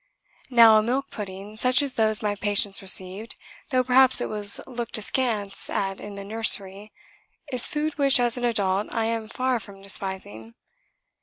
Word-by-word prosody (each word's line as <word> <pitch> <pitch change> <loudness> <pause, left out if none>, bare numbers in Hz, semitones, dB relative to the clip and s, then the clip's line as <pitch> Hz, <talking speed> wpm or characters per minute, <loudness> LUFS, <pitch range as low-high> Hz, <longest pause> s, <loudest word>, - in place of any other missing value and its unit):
Now 230 -3 +6
a - - 0
milk 260 +5 -3
pudding, 200 +1 -9
such 255 +4 +1
as 275 -2 -4
those 220 -2 -1
my 210 -1 -1
patients 205 -1 -2
received, 190 +3 +2 0.3
though 255 -3 +1
perhaps 255 +1 +3
it - - -4
was 205 -1 +2
looked 240 -3 -4
askance 210 -3 -3
at 195 -1 -4
in 205 -1 -10
the 200 - -9
nursery, 205 -1 +4 0.6
is 250 -2 +5
food 305 0 -4
which, 275 -2 +4
as 240 -1 -1
an 245 - -7
adult, 205 -4 0
I 225 -1 -2
am 225 -1 -4
far 255 +1 -2
from 200 -2 -15
despising. 190 - -4
215 Hz, 165 wpm, -23 LUFS, 200-245 Hz, 0.6 s, Now